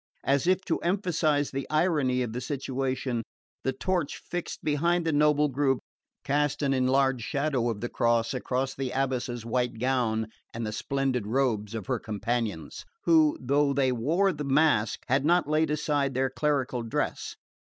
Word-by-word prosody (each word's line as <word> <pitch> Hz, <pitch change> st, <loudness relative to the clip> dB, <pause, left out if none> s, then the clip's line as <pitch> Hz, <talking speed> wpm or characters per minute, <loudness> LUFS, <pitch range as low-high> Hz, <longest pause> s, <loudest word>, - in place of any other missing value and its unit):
As 140 Hz, +4 st, +1 dB
if 185 Hz, +1 st, +3 dB
to 165 Hz, -, 0 dB
emphasise 165 Hz, -6 st, +1 dB
the 135 Hz, 0 st, -4 dB
irony 150 Hz, -6 st, +2 dB
of 115 Hz, -2 st, -4 dB
the 125 Hz, -, -3 dB
situation, 130 Hz, -2 st, -2 dB, 0.4 s
the 130 Hz, -, +1 dB
torch 170 Hz, +3 st, -1 dB
fixed 175 Hz, -1 st, -6 dB
behind 170 Hz, +3 st, +1 dB
this 160 Hz, -, +1 dB
noble 150 Hz, 0 st, +4 dB
group 135 Hz, -1 st, +1 dB, 0.5 s
cast 145 Hz, +1 st, 0 dB
an 135 Hz, -1 st, +2 dB
enlarged 130 Hz, -1 st, +2 dB
shadow 140 Hz, -3 st, 0 dB
of 105 Hz, -3 st, -4 dB
the 120 Hz, -, -1 dB
cross 115 Hz, 0 st, +1 dB
over 130 Hz, +1 st, -1 dB
the 135 Hz, -1 st, -3 dB
abbess's 125 Hz, -3 st, -2 dB
white 120 Hz, 0 st, -1 dB
gown 120 Hz, -3 st, +1 dB, 0.3 s
and 115 Hz, 0 st, -3 dB
the 110 Hz, -, -3 dB
splendid 130 Hz, -2 st, -1 dB
robes 115 Hz, -3 st, 0 dB
of 110 Hz, -4 st, -4 dB
her -, -, -1 dB
companions, 110 Hz, -6 st, -3 dB, 0.2 s
who, 160 Hz, -3 st, +4 dB
though 140 Hz, +2 st, +2 dB
they 135 Hz, -2 st, +2 dB
wore 165 Hz, +11 st, +1 dB
the 150 Hz, -1 st, -5 dB
mask, 140 Hz, -6 st, +2 dB
had 135 Hz, +2 st, +2 dB
not 175 Hz, +1 st, +3 dB
laid 155 Hz, +1 st, +2 dB
aside 145 Hz, -3 st, 0 dB
their 130 Hz, 0 st, +1 dB
clerical 135 Hz, -4 st, 0 dB
dress. 115 Hz, -1 st, -3 dB
135 Hz, 160 wpm, -28 LUFS, 125-150 Hz, 0.5 s, noble